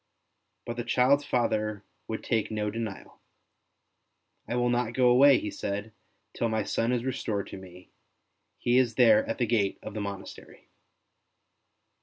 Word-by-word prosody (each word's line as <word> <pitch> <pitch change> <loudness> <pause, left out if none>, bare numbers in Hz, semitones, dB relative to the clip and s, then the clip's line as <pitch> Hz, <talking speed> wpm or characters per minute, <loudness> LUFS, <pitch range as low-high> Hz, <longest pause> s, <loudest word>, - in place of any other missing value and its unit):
But 120 - -5
the 120 - -2
child's 135 +4 +3
father 110 -5 -1 0.2
would 110 - -5
take 110 -3 0
no 105 -1 -2
denial. 110 -3 -6 0.6
'' - - -49
I 120 - -1
will 120 0 +1
not 120 -1 0
go 125 -1 +4
away," 135 +2 +7
he 105 - -4
said, 105 +2 -4 0.2
'' - - -47
till 115 - -1
my 110 -1 0
son 115 +4 -1
is 125 -1 -1
restored 110 -6 -2
to - - -8
me; 90 -1 -14 0.7
he 120 +1 +2
is 120 -3 +1
there 275 0 +6
at 285 - -3
the - - +1
gate 105 -4 0
of - - -7
the 105 - -4
monastery." 100 -1 -9
115 Hz, 165 wpm, -28 LUFS, 105-125 Hz, 0.7 s, away